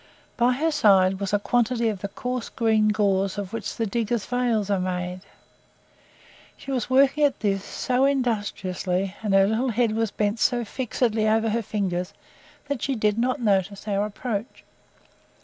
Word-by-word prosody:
By 240 +1 +3
her 315 +6 0
side 195 -9 +4
was 200 -1 -3
a 205 - +3
quantity 235 +3 +1
of 210 -3 -2
the 200 - -2
coarse 250 +4 -4
green 220 -2 +2
gauze 200 -2 +1
of 200 -1 -5
which 225 -1 -4
the 225 - -1
diggers' 230 0 -1
veils 235 -5 0
are 195 - +2
made. 180 0 -3 1.4
She 275 - -8
was 255 -3 -2
working 275 +3 +4
at 285 -2 +2
this 195 -2 0
so 255 +5 0
industriously, 205 -7 -1
and 205 -3 +1
her 195 0 +6
little 225 +5 0
head 235 0 +1
was 225 0 0
bent 210 +2 -1
so 240 +1 +1
fixedly 225 -2 -1
over 220 +1 +2
her 230 +2 0
fingers 195 -3 -3 0.5
that 280 -4 -3
she 275 - -1
did 215 -1 +1
not 250 +1 0
notice 200 -1 0
our 205 0 0
approach. 220 +1 -5
215 Hz, 165 wpm, -24 LUFS, 200-245 Hz, 1.4 s, her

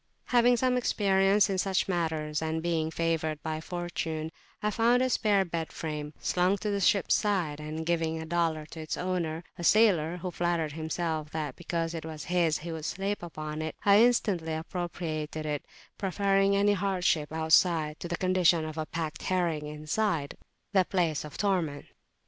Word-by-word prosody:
Having 245 0 +4
some 250 +1 +2
experience 200 -3 +3
in 190 -1 -1
such 190 0 +1
matters, 160 -4 -1
and 160 0 -2
being 165 -2 0
favoured 160 -2 -1
by 155 0 -3
fortune, 165 -2 -4 0.3
I 210 - +1
found 235 +4 +3
a 255 - +1
spare 205 -5 +3
bed 165 -2 -4
frame 150 -2 -5
slung 180 +2 +1
to 210 +1 -2
the 200 - 0
ship's 195 +1 +3
side; 180 -8 0
and 155 +1 -5
giving 165 -1 0
a 160 - -5
dollar 165 -2 0
to 160 - -8
its 155 -1 -4
owner, 175 -3 -2 0.2
a - - -4
sailor 180 -5 +4
who 180 +1 -4
flattered 170 -3 0
himself 160 0 -3
that, 150 -4 -3
because 165 -1 -3
it 165 - -5
was 155 -1 -7
his, 170 -3 +1
he 170 +2 -6
would 160 -1 -5
sleep 195 +4 -2
upon 155 -2 -5
it, 155 0 -4
I 200 +1 +7
instantly 200 -9 +2
appropriated 160 -2 -4
it, 150 -1 -3 0.3
preferring 195 0 +2
any 205 +1 +4
hardship 180 -6 0
outside, 160 -1 +3
to - - -5
the 175 0 -2
condition 180 -3 +3
of 155 0 -5
a 155 - -3
packed 160 -2 -4
herring 170 -5 0
inside, 155 +1 -1 0.4
the 190 -2 +5
place 170 -5 0
of 150 -1 -9
torment. 175 -8 0
170 Hz, 170 wpm, -29 LUFS, 155-190 Hz, 0.4 s, I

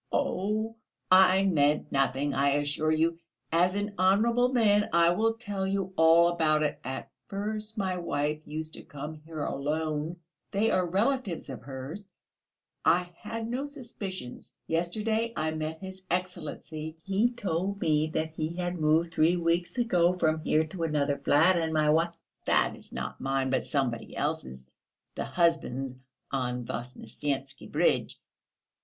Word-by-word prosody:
"Oh, 215 +4 -1 0.3
I 190 +1 +7
meant 150 -5 +2
nothing, 135 +1 +1
I 140 +1 +3
assure 145 +2 +1
you. 165 +1 +1 0.3
As 175 +3 +3
an 205 0 -2
honourable 230 +6 +4
man 210 -4 +3
I 170 0 +5
will 225 +5 +1
tell 205 -4 -3
you 195 -1 -1
all 165 +1 +6
about 155 -3 +2
it. 150 - -1
At 130 +1 -5 0.2
first 215 +2 -4
my 190 -3 0
wife 150 -3 -1
used 155 +1 -6
to - - -7
come 150 +2 -7
here 155 -2 -5
alone. 155 +3 -2 0.3
They 210 +3 +1
are 185 -1 +2
relatives 200 - 0
of 130 - -7
hers; 140 - -8 0.7
I 175 +1 +3
had 225 +4 -5
no 255 +5 -2
suspicions; 205 - -8
yesterday 215 +7 -1
I 155 0 0
met 155 0 -3
his 190 0 -8
Excellency: 165 -3 -4
he 195 +5 +2
told 195 -2 -2
me 155 -2 +2
that 160 0 -2
he 160 +1 -3
had 175 -1 -2
moved 160 +2 +3
three 165 +3 +3
weeks 170 +4 0
ago 180 -8 +3
from 160 -3 +1
here 155 +1 +2
to 170 +3 -8
another 145 -3 0
flat, 165 +5 +4
and 160 -1 0
my 155 -1 +3
wi... 160 +3 +3 0.4
that - - +3
is, - - -11
not - - -5
mine, 135 -1 0
but 130 - 0
somebody 125 -5 -1
else's 65 0 -3 0.5
(the - - -3
husband's 155 -7 +1 0.4
on 125 -2 -2
the - - -5
Voznesensky 135 +3 -5
Bridge) - - +1
165 Hz, 150 wpm, -29 LUFS, 150-195 Hz, 0.7 s, I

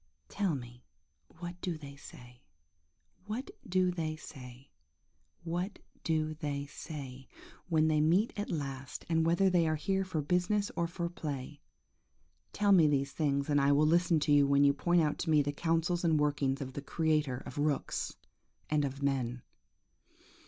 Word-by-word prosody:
Tell 195 -6 0
me 120 -1 -9 0.5
what 175 +1 -7
do 175 -4 -2
they 140 -2 -10
say, 125 -3 -13 0.9
what 250 - -4 0.2
do 185 0 +3
they 160 -3 -3
say, 130 -3 -12 0.7
what 175 +4 -3 0.3
do 155 -1 0
they 145 -2 -3
say, 135 -3 -8 0.4
when 160 -2 +3
they 155 -1 +3
meet 180 +9 +3
at 205 0 -3
last, 135 -4 -5
and 165 -1 +2
whether 175 +4 +3
they 175 -3 +3
are 155 - +1
here 195 +5 0
for 170 -5 -2
business 180 +6 +1
or 170 - 0
for 170 0 -3
play. 145 -4 -6 0.9
Tell 205 -1 +2
me 170 -5 +7
these 140 -1 +1
things, 140 -3 0
and 145 -1 +3
then 140 - +2
I - - +5
will 150 +2 +4
listen 170 +1 +3
to 145 - +1
you 145 -1 +6
when 140 0 +4
you 140 0 +5
point 175 +4 +2
out 150 - -1
to 165 - -2
me 150 -2 +5
the 145 +1 -2
counsels 165 +3 0
and 165 -2 +3
the 150 - +2
workings 145 -2 0
of 130 -1 -5
the 140 - -5
Creator 150 -4 0
of - - -6
rooks 145 -1 -1 0.6
and 150 -1 +3
of 140 0 -4
men. 125 -3 -1
155 Hz, 175 wpm, -32 LUFS, 140-175 Hz, 0.9 s, me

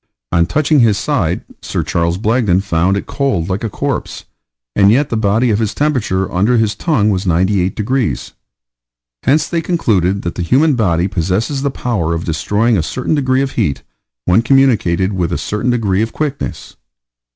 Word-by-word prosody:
On 85 0 +2
touching 150 - +2
his 110 -5 +4
side, - - -1 0.2
Sir - - -3
Charles 85 0 -1
Blagden 105 -3 +1
found 95 +1 +1
it - - -4
cold 100 - -1
like 95 +3 -2
a 115 - -1
corpse, - - -4 0.5
and 100 -1 +5
yet 135 +7 +3
the - - -1
heat 110 +3 +2
of 105 - +1
his 110 -1 -2
body 125 -11 0
under 105 +7 +2
his 110 -2 +1
tongue 110 -4 +1
was 95 0 -2
98 95 +2 +1
degrees. 125 +3 -2 0.9
Hence 150 +4 +2
they 170 -1 -1
concluded 100 - 0
that 85 - -3
the - - -5
human 140 - +3
body 90 -7 +1
possesses 95 - -1
the 140 - 0
power 100 -11 -2
of 80 - -4
destroying 105 +8 +1
a - - +2
certain 125 - -2
degree 130 -2 +1
of 135 - -3
heat 95 - -1 0.4
when 90 +5 +4
communicated 115 -8 +2
with 90 -2 -1
a - - -1
certain 105 +4 -2
degree 105 -5 +1
of 110 0 -2
quickness. 145 -3 -4
105 Hz, 175 wpm, -16 LUFS, 90-130 Hz, 0.9 s, and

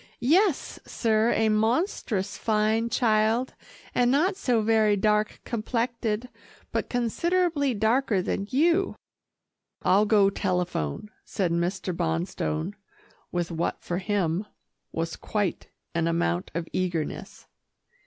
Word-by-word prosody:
"Yes, 345 - +2
sir 225 0 +1
a 220 - +2
monstrous 215 - 0
fine 220 +1 +1
child, 225 +2 +2 0.4
and 245 0 +3
not 330 +9 +2
so 245 - +1
very 215 -1 +3
dark 210 +1 +1
complected 230 0 -2 0.4
but - - -2
considerable 290 +5 +1
darker 220 0 +2
than 195 +2 -2
you." 340 +8 +2 0.9
"I'll 205 +3 +4
go 205 -2 +5
telephone," 180 - -2
said 185 -5 -1
Mr. 180 +2 -1
Bonstone, 165 0 -2 0.6
with 175 -1 -2
what 170 +1 -2
for 175 +1 -2
him, 195 -1 -1 0.4
was 165 0 -3
quite 205 -5 -2 0.3
an 170 -1 +1
amount 90 - 0
of 170 0 -2
eagerness. 175 -4 -3
215 Hz, 110 wpm, -26 LUFS, 180-240 Hz, 0.9 s, go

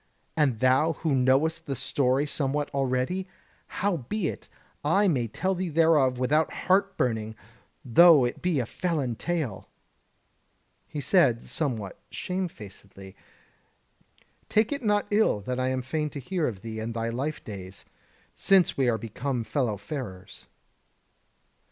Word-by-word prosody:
And 135 -8 +1
thou 130 +6 +4
who 160 0 -1
knowest 140 +6 +2
the 135 - -2
story 135 +1 +1
somewhat 145 0 -1
already? 135 +8 -1 0.4
Howbeit, 185 - -2 0.3
I 195 +8 +3
may 130 -9 +1
tell 185 - -1
thee 185 -1 -3
thereof 155 -5 +3
without 150 +5 +2
heart 195 +1 +1
burning, 110 -3 -1 0.5
though 150 +2 +7
it 120 - -4
be 175 -5 +1
a 120 - -1
felon 150 -4 -2
tale." 155 - -3 1.2
He 145 - -5
said, 135 - +3
somewhat 115 - -3
shame 185 0 -3
facedly: 100 - -12 1.3
"Take 215 +3 +2
it 285 -1 -2
not 205 -1 +2
ill 205 - +3
that 125 +5 -3
I 130 - 0
am 130 -1 -1
fain 150 +4 -2
to 145 - -7
hear 170 +4 -1
of 100 -6 -5
thee 110 0 -6
and 115 +1 -4
thy 115 0 -1
life 135 +6 -3
days, 95 -2 -8 0.5
since 190 -3 +3
we 130 -3 +2
are 115 - +1
become 125 +2 -3
fellow 110 -1 -1
farers." 105 -5 -8
135 Hz, 140 wpm, -27 LUFS, 120-165 Hz, 1.3 s, though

